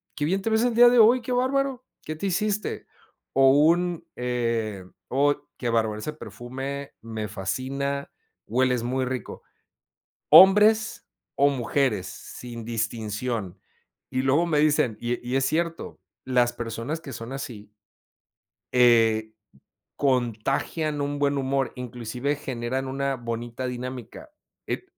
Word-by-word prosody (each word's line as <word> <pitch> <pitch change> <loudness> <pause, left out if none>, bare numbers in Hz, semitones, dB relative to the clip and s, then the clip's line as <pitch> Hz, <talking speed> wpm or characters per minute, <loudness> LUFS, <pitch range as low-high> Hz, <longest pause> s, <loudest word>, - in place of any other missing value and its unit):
qué 145 - -3
bien 190 +6 +1
te 225 - -1
ves 220 +1 +2
el 245 -1 +2
día 240 +1 +8
de 245 -1 +4
hoy, 235 +3 +6
qué 250 +2 -3
bárbaro, 260 0 0 0.2
qué 155 - -4
te 160 - -5
hiciste, 210 +3 -1 0.5
o 135 0 +6
un, 170 +4 +3
eh, 115 -5 -2 0.2
o 145 +2 +3 0.2
qué 120 - -2
bárbaro, 110 -2 0
ese 150 +7 -4
perfume 135 +3 -7
me 110 -1 -5
fascina, 135 +8 -3 0.4
hueles 125 +1 +1
muy 130 +2 -1
rico. 130 0 -5 0.9
Hombres 210 +3 +7 0.3
o 140 +1 +4
mujeres, 130 -5 0
sin 120 -2 -9
distinción, 110 -2 -3 0.5
y 130 0 -1
luego 140 +6 +3
me 155 -3 +2
dicen: 145 -7 +2
"Y 120 0 -3
y 125 - -1
es 135 - +2
cierto, 165 +4 -2 0.2
las 125 -2 +2
personas 120 +6 -4
que 140 -5 -9
son 115 +2 -7
así" 120 -7 -7 1.1
Eh, 115 -3 +4 0.6
contagian 135 +4 0
un 145 0 -2
buen 145 0 +1
humor, 135 0 0
inclusive 125 +3 -3
generan 130 -1 -3
una 135 0 -1
bonita 120 +1 -5
dinámica. 125 - -7 0.4
Eh, - - -3
130 Hz, 130 wpm, -25 LUFS, 120-150 Hz, 1.1 s, día